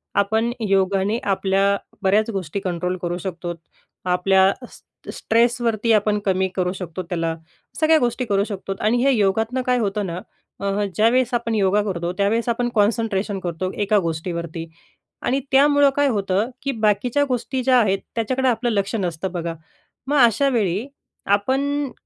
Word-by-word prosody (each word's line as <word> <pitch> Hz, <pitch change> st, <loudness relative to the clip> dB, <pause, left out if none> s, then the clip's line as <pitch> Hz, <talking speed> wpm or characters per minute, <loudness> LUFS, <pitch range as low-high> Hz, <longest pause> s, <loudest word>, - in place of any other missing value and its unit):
आपण 220 Hz, +4 st, +1 dB, 0.2 s
योगाने 195 Hz, +2 st, +2 dB
आपल्या 195 Hz, 0 st, +1 dB, 0.2 s
बऱ्याच 205 Hz, +3 st, +2 dB
गोष्टी 195 Hz, -1 st, -3 dB
कंट्रोल 180 Hz, -1 st, -2 dB
करू 175 Hz, 0 st, -2 dB
शकतो, 175 Hz, -1 st, -5 dB, 0.5 s
आपल्या 190 Hz, +2 st, +3 dB, 0.2 s
स -, -, -17 dB, 0.3 s
स्ट्रेसवरती 230 Hz, -1 st, +1 dB
आपण 210 Hz, 0 st, +2 dB
कमी 190 Hz, -1 st, +2 dB
करू 180 Hz, -1 st, 0 dB
शकतो, 180 Hz, -2 st, -6 dB
त्याला 165 Hz, -2 st, -2 dB, 0.4 s
सगळ्या 315 Hz, 0 st, +5 dB
गोष्टी 245 Hz, +1 st, -1 dB
करू 200 Hz, -3 st, +1 dB
शकतो. 195 Hz, -2 st, -5 dB
आणि 220 Hz, +3 st, +2 dB
हे 275 Hz, -, +4 dB
योगातनं 225 Hz, +3 st, +1 dB
काय 250 Hz, 0 st, +1 dB
होतं 205 Hz, -2 st, -1 dB
ना, 170 Hz, 0 st, -4 dB, 0.4 s
अ, 200 Hz, +1 st, -1 dB
ज्या 215 Hz, +4 st, +4 dB
वेळेस 250 Hz, 0 st, +1 dB
आपण 230 Hz, -1 st, 0 dB
योगा 200 Hz, 0 st, +2 dB
करतो, 175 Hz, -4 st, -2 dB
त्या 200 Hz, 0 st, +2 dB
वेळेस 230 Hz, +2 st, 0 dB
आपण 240 Hz, +1 st, 0 dB
कॉन्सन्ट्रेशन 210 Hz, -2 st, +1 dB
करतो 185 Hz, +1 st, -3 dB
एका 210 Hz, +1 st, +2 dB
गोष्टीवरती 165 Hz, 0 st, -4 dB, 0.6 s
आणि 265 Hz, +2 st, 0 dB
त्यामुळे 285 Hz, +1 st, +5 dB
काय 285 Hz, 0 st, +3 dB
होतं 205 Hz, -1 st, 0 dB
की 275 Hz, -, 0 dB
बाकीच्या 220 Hz, +4 st, +1 dB
गोष्टी 255 Hz, +1 st, -2 dB
ज्या 255 Hz, 0 st, +4 dB
आहेत, 195 Hz, -4 st, +2 dB, 0.2 s
त्याच्याकडे 260 Hz, +4 st, 0 dB
आपलं 240 Hz, +1 st, 0 dB
लक्ष 200 Hz, -1 st, -1 dB
नसतं 180 Hz, -2 st, -2 dB
बघा. 170 Hz, -2 st, -3 dB, 0.5 s
मग 290 Hz, +2 st, +1 dB
अशा 255 Hz, +5 st, +2 dB
वेळी 215 Hz, -1 st, 0 dB, 0.4 s
आपन 270 Hz, +7 st, 0 dB
205 Hz, 155 wpm, -22 LUFS, 190-240 Hz, 0.6 s, सगळ्या